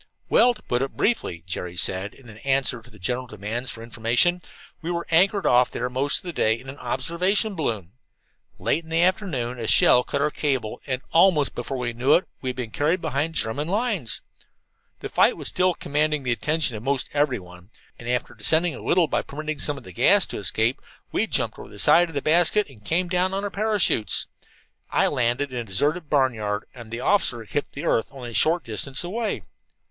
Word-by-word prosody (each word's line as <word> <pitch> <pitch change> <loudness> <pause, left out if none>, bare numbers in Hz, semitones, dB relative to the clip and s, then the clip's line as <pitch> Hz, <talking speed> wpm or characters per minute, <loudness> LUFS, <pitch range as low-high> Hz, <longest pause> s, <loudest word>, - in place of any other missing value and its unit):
"Well, 245 0 +4
to 210 - -17
put 120 +1 -1
it 135 - -4
briefly," 90 - -1
Jerry 90 -1 -5
said, 95 +3 -1
in 135 - -18
answer 135 -2 0
to 120 - -18
the 110 - -17
general 125 +6 -2
demands 110 +4 -5
for 115 - -6
information, 120 +10 +2 0.4
"we 165 - -5
were 170 -1 -2
anchored 195 +4 +3
off 125 0 +4
there 125 +1 -4
most 135 +3 +1
of - - -25
the 175 -2 -6
day 110 -5 +1
in 130 - -12
an 140 - -9
observation 175 - 0
balloon. 110 - -3 0.7
Late 165 - 0
in 160 - -16
the 165 +1 +2
afternoon 145 - -1
a 115 - -4
shell 125 - +6
cut 140 - -3
our 150 - +1
cable, 130 -9 -2
and 130 -1 -2
almost 165 -4 +4
before 130 +2 -5
we 120 -2 -3
knew 130 +5 +3
it 180 - +1
we 130 - -3
had 125 - -4
been 120 -3 -5
carried 155 - +1
behind 160 0 -2
the - - +3
German 140 +7 -3
lines. 200 - -1 0.8
"The - - -4
fight - - +3
was - - -4
still 185 -1 +1
commanding 150 0 -1
the 125 - -1
attention 150 +1 +1
of 110 +4 -8
almost 140 -2 -1
everyone, 100 -11 -2 0.3
and 120 - -7
after 125 0 -1
descending 165 +1 +3
a - - -9
little 175 -1 +3
by - - -1
permitting 155 +1 -6
some 145 +1 +2
of - - -11
the 95 - -12
gas - - +5
to - - -4
escape, 115 +4 0 0.3
we - - 0
jumped - - -1
over - - -10
the - - -13
side 175 +1 +5
of 165 - -11
the 140 - -2
basket 175 +6 +3
and 110 -6 -17
came 175 +9 0
down 185 +1 0
on 195 - -2
our 205 - -3
parachutes. 205 - +2 0.6
I - - +2
landed 125 +3 0
in 125 - -2
a - - -3
deserted 145 - -1
barnyard, 115 -7 0
and 120 -3 -11
the 115 +2 -5
officer 130 - +1
hit 145 +7 -3
the 145 +4 -6
earth 115 - +1
only 125 -3 -8
a - - -11
short 165 +8 +3
distance 130 - -2
away. 215 +6 -3
135 Hz, 210 wpm, -24 LUFS, 120-170 Hz, 0.8 s, shell